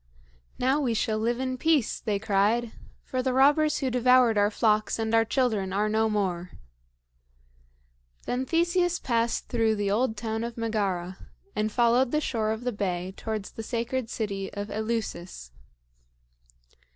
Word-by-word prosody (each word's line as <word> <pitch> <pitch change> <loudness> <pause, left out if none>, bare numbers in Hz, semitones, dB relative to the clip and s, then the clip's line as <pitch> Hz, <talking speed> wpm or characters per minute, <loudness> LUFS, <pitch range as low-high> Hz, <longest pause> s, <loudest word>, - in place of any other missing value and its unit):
"Now 265 +3 +2
we 240 -5 0
shall 215 0 0
live 235 +2 0
in 255 -1 -2
peace," 310 -6 +2
they 210 -2 -1
cried; 215 +3 +1 0.3
"for 255 - -2
the 255 0 0
robbers 295 +3 +4
who 265 -2 0
devoured 250 -1 +4
our 205 0 +3
flocks 215 0 +1
and 225 0 -2
our 225 0 +5
children 220 -5 0
are 205 +2 +1
no 220 +1 +2
more." 185 -4 -2 1.7
Then 255 +1 -2
Theseus 345 +1 +2
passed 235 -1 -1
through 225 -3 +1
the 205 -1 -1
old 220 +1 +1
town 225 0 -3
of 235 0 -5
Megara, 195 -5 -2 0.3
and 215 0 0
followed 240 +3 +3
the 300 - +1
shore 225 -7 -1
of 220 +2 -3
the 250 - -1
bay 185 -3 -3
towards 215 -3 -4
the - - -7
sacred 235 +1 -3
city 200 -4 -3
of 205 +1 -5
Eleusis. 205 - -4
225 Hz, 150 wpm, -27 LUFS, 210-250 Hz, 1.7 s, our